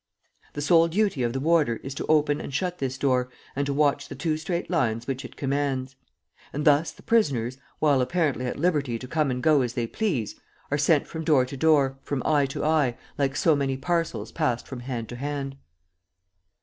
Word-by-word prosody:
The 145 Hz, -, -4 dB
sole 165 Hz, +1 st, +5 dB
duty 195 Hz, -4 st, 0 dB
of 120 Hz, -1 st, +1 dB
the 135 Hz, -, -2 dB
warder 155 Hz, -5 st, +3 dB
is 135 Hz, -, -5 dB
to -, -, -5 dB
open 150 Hz, -1 st, +3 dB
and -, -, -6 dB
shut 180 Hz, +5 st, -2 dB
this 130 Hz, -1 st, -2 dB
door 125 Hz, -2 st, +1 dB, 0.3 s
and 140 Hz, +1 st, -1 dB
to 140 Hz, -, 0 dB
watch 140 Hz, -1 st, +2 dB
the -, -, -6 dB
two 160 Hz, -3 st, -1 dB
straight 170 Hz, +3 st, -3 dB
lines 120 Hz, -9 st, 0 dB
which 135 Hz, 0 st, -3 dB
it -, -, -10 dB
commands. 135 Hz, -2 st, -1 dB, 0.6 s
And 150 Hz, +1 st, -3 dB
thus 150 Hz, +1 st, +4 dB
the -, -, -18 dB
prisoners, 135 Hz, -, +1 dB, 0.2 s
while 145 Hz, -4 st, +3 dB
apparently 140 Hz, -3 st, 0 dB
at -, -, -3 dB
liberty 145 Hz, -7 st, +1 dB
to 125 Hz, -, -8 dB
come 155 Hz, 0 st, +1 dB
and 125 Hz, 0 st, -2 dB
go 155 Hz, -3 st, +5 dB
as 120 Hz, -2 st, -2 dB
they 120 Hz, -2 st, -1 dB
please, 140 Hz, -, -2 dB, 0.3 s
are 145 Hz, -, +2 dB
sent 150 Hz, 0 st, +3 dB
from 160 Hz, -1 st, -6 dB
door 150 Hz, -5 st, +4 dB
to 130 Hz, -, -8 dB
door, 135 Hz, -2 st, +3 dB
from 135 Hz, -2 st, -3 dB
eye 145 Hz, -3 st, +3 dB
to 135 Hz, -, -4 dB
eye, 150 Hz, -6 st, +2 dB, 0.2 s
like 135 Hz, -1 st, +1 dB
so 160 Hz, +1 st, +3 dB
many 135 Hz, -2 st, -1 dB
parcels 165 Hz, +3 st, -1 dB
passed 125 Hz, -7 st, -1 dB
from 130 Hz, -, -7 dB
hand 120 Hz, -2 st, -4 dB
to 120 Hz, -, -7 dB
hand. 140 Hz, 0 st, -4 dB
140 Hz, 205 wpm, -26 LUFS, 130-155 Hz, 0.6 s, sole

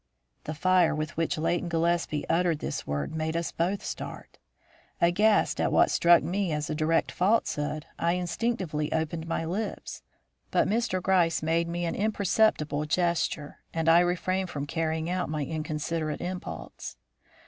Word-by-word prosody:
The 155 Hz, -, -4 dB
fire 180 Hz, 0 st, +3 dB
with 155 Hz, +1 st, -4 dB
which 165 Hz, 0 st, 0 dB
Leighton 170 Hz, +2 st, 0 dB
Gillespie 165 Hz, -2 st, 0 dB
uttered 170 Hz, -1 st, +2 dB
this -, -, -4 dB
word 75 Hz, -, -2 dB
made 160 Hz, +1 st, -1 dB
us 170 Hz, -, -2 dB
both 185 Hz, +4 st, -1 dB
start. -, -, -7 dB, 0.6 s
Aghast 205 Hz, +5 st, +3 dB
at -, -, +1 dB
what -, -, +4 dB
struck 170 Hz, 0 st, +5 dB
me 190 Hz, -1 st, -1 dB
as 150 Hz, 0 st, -2 dB
a -, -, 0 dB
direct 155 Hz, +2 st, +1 dB
falsehood, 155 Hz, -7 st, 0 dB
I 170 Hz, +1 st, +2 dB
instinctively 180 Hz, -4 st, -2 dB
opened 160 Hz, +1 st, -2 dB
my 165 Hz, 0 st, -1 dB
lips. 200 Hz, +6 st, -4 dB, 0.5 s
But -, -, +2 dB
Mr. 215 Hz, -4 st, 0 dB
Gryce 170 Hz, -4 st, +2 dB
made 165 Hz, +1 st, +1 dB
me 175 Hz, +1 st, -2 dB
an 165 Hz, -, -1 dB
imperceptible 200 Hz, -7 st, +1 dB
gesture, 165 Hz, -2 st, -1 dB, 0.2 s
and 165 Hz, 0 st, -1 dB
I 165 Hz, +1 st, +7 dB
refrained 180 Hz, +1 st, 0 dB
from 145 Hz, -3 st, -4 dB
carrying 160 Hz, +1 st, -2 dB
out 180 Hz, -4 st, -1 dB
my 150 Hz, -2 st, -2 dB
inconsiderate 155 Hz, 0 st, -3 dB
impulse. 180 Hz, +1 st, -6 dB
165 Hz, 150 wpm, -28 LUFS, 155-180 Hz, 0.6 s, I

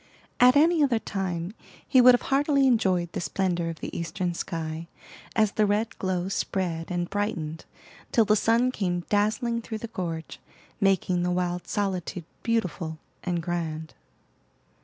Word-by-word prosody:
At 250 Hz, +1 st, +7 dB
any 320 Hz, +2 st, +5 dB
other 265 Hz, -5 st, +3 dB
time 185 Hz, -4 st, -3 dB, 0.3 s
he 260 Hz, -, +6 dB
would 250 Hz, 0 st, +9 dB
have -, -, -3 dB
heartily 280 Hz, 0 st, +3 dB
enjoyed 185 Hz, -9 st, +2 dB
the -, -, -3 dB
splendor 175 Hz, -2 st, -1 dB
of 165 Hz, -, -7 dB
the -, -, -5 dB
eastern 175 Hz, +1 st, -2 dB
sky, 165 Hz, -1 st, -4 dB, 0.5 s
as 215 Hz, -3 st, +3 dB
the 215 Hz, -1 st, +2 dB
red 215 Hz, +3 st, 0 dB
glow 185 Hz, -1 st, -1 dB
spread 180 Hz, -4 st, -2 dB
and 175 Hz, -1 st, -1 dB
brightened, 170 Hz, -7 st, -3 dB, 0.5 s
till 225 Hz, -, +4 dB
the 210 Hz, +1 st, +4 dB
sun 230 Hz, +4 st, +3 dB
came 180 Hz, -7 st, -1 dB
dazzling 220 Hz, +3 st, +1 dB
through 225 Hz, -1 st, -5 dB
the 230 Hz, -, -6 dB
gorge, 165 Hz, -6 st, -5 dB, 0.4 s
making 190 Hz, -2 st, +2 dB
the 180 Hz, -, 0 dB
wild 180 Hz, 0 st, -1 dB
solitude 190 Hz, -4 st, -2 dB, 0.2 s
beautiful 180 Hz, -8 st, -1 dB, 0.3 s
and 175 Hz, -2 st, -1 dB
grand. 160 Hz, -2 st, -3 dB
190 Hz, 150 wpm, -26 LUFS, 175-225 Hz, 0.5 s, would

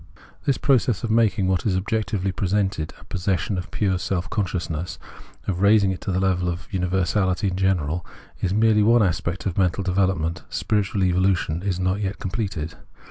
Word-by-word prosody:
This 140 Hz, -2 st, +2 dB
process 125 Hz, -6 st, +2 dB
of 115 Hz, -, -1 dB
making 105 Hz, -4 st, +3 dB
what 95 Hz, -2 st, +1 dB
is 95 Hz, -4 st, +1 dB
objectively 105 Hz, -1 st, -1 dB
presented 95 Hz, -4 st, -1 dB
a -, -, -15 dB
possession 95 Hz, +2 st, -1 dB
of 90 Hz, -1 st, -4 dB
pm:e 95 Hz, -3 st, 0 dB
self 90 Hz, -1 st, -2 dB
consciousness, 90 Hz, -5 st, -2 dB, 0.5 s
of 95 Hz, -2 st, -2 dB
raising 100 Hz, -1 st, +5 dB
it 95 Hz, -, -5 dB
to -, -, -2 dB
the 90 Hz, -, +1 dB
level 90 Hz, -2 st, +1 dB
of 85 Hz, +1 st, -5 dB
universahty 95 Hz, +1 st, +1 dB
in -, -, -3 dB
general, 90 Hz, -4 st, 0 dB, 0.4 s
is 95 Hz, -, 0 dB
merely 110 Hz, +1 st, +4 dB
one 115 Hz, +2 st, +5 dB
aspect 90 Hz, -1 st, -1 dB
of 95 Hz, -1 st, -1 dB
mental 95 Hz, +1 st, +1 dB
development; 90 Hz, -3 st, 0 dB
spiritual 100 Hz, -2 st, 0 dB
evolution 90 Hz, -2 st, +1 dB
is 95 Hz, -2 st, -1 dB
not 95 Hz, +2 st, 0 dB
yet 100 Hz, 0 st, -2 dB
completed. 95 Hz, -5 st, -3 dB
95 Hz, 170 wpm, -23 LUFS, 90-100 Hz, 0.5 s, raising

